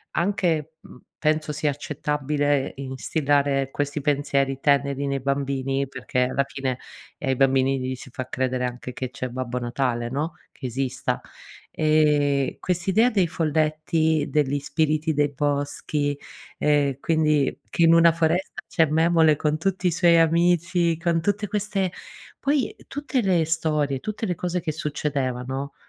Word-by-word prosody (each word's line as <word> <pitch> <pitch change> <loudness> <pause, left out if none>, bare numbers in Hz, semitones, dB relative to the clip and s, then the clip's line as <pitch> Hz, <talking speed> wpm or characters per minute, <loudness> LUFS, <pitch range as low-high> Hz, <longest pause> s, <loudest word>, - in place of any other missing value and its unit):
anche, 170 -4 0
mhmm, 125 - -15 0.2
penso 155 0 +1
sia 150 0 0
accettabile 145 -1 -1
instillare 135 +1 0
questi 145 +1 -2
pensieri 140 -2 0
teneri 140 -1 +1
nei 140 0 -1
bambini, 135 0 -1
perché 130 -1 -2
alla 130 +2 +1
fine, 135 -2 -3 0.4
ehm, 135 - -3
ai 130 - +2
bambini 135 0 +3
gli 130 0 -3
si 130 - -11
fa 130 0 -5
credere 130 -1 -1
anche 125 0 -5
che 130 0 -4
c'è 130 - -4
Babbo 125 0 -3
Natale, 120 -1 -1
no, 150 +5 -2 0.2
che 135 - -10
esista. 130 +1 -2 0.5
Ehm, 150 -3 +2
quest'idea 190 +7 +2
dei 195 -6 +2
folletti, 155 -1 +1
degli 145 -1 +1
spiriti 155 +2 0
dei 145 0 +2
boschi, 145 0 -1 0.4
ehm, 145 -3 +2
quindi 150 -4 +1
che 170 - +1
in 165 0 +7
una 165 0 +7
foresta 165 +3 0 0.2
c'è 165 -3 +3
Memole 160 0 +4
con 150 +1 0
tutti 185 +2 0
i - - +2
suoi 170 0 +4
amici, 170 0 +2
con 170 -1 0
tutte 205 +3 -1
queste 200 -3 -1 0.5
poi 280 -1 0
tutte 280 -2 -2
le 180 -5 +2
storie, 150 -4 0
tutte 215 - -4
le 180 -4 -1
cose 180 +1 -2
che 155 -2 -2
succedevano, 140 -3 -3
150 Hz, 145 wpm, -24 LUFS, 135-165 Hz, 0.5 s, in